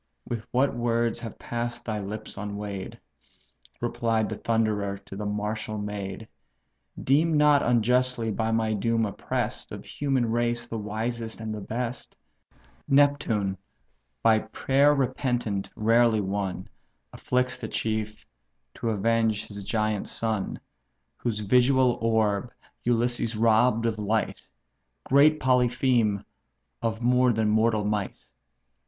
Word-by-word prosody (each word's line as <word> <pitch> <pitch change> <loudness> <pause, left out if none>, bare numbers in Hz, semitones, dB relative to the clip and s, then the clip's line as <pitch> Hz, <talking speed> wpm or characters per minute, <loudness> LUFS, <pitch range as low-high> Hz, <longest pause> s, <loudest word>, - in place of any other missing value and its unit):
what 130 +2 +1
words 120 -1 0
have 115 -3 -7
pass'd 120 0 -4
thy 110 -2 -2
lips 105 +2 -6
unweigh'd! 100 -1 -5 0.8
(Replied 115 -2 0
the 110 - -4
Thunderer 105 -3 0
to 100 0 -11
the 105 +1 -4
martial 105 +1 -3
maid;) 105 0 -5 0.8
Deem 155 +4 +3
not 150 -1 +5
unjustly 125 0 +2
by 110 +2 -1
my 110 -1 +1
doom 115 +2 +1
oppress'd, 100 - -3
Of - - -8
human 130 -5 -1
race 120 0 0
the 115 -2 -5
wisest 110 +2 -3
and 110 -1 -4
the 105 - -5
best. 120 +4 -4 0.7
Neptune, 135 -9 +2 0.6
by 110 -1 +5
prayer 135 +6 +2
repentant 125 -6 -1
rarely 115 0 +3
won, 95 -2 -3 0.5
Afflicts 125 0 0
the 110 - -5
chief, 110 -1 -3 0.5
to 115 - -3
avenge 110 0 +1
his 100 -1 -8
giant 110 -1 -1
son, 110 -4 -2 0.6
Whose 110 -3 -2
visual 125 +3 +3
orb 110 0 +1 0.3
Ulysses 120 -1 +1
robb'd 115 +1 +3
of 110 -2 -1
light; 105 +1 -1 0.6
Great 150 +3 +5
Polypheme, 125 -5 +2 0.6
of 115 0 -2
more 125 +1 +4
than 110 -1 +1
mortal 110 -1 +2
might? 105 -2 -1
115 Hz, 120 wpm, -26 LUFS, 105-120 Hz, 0.8 s, not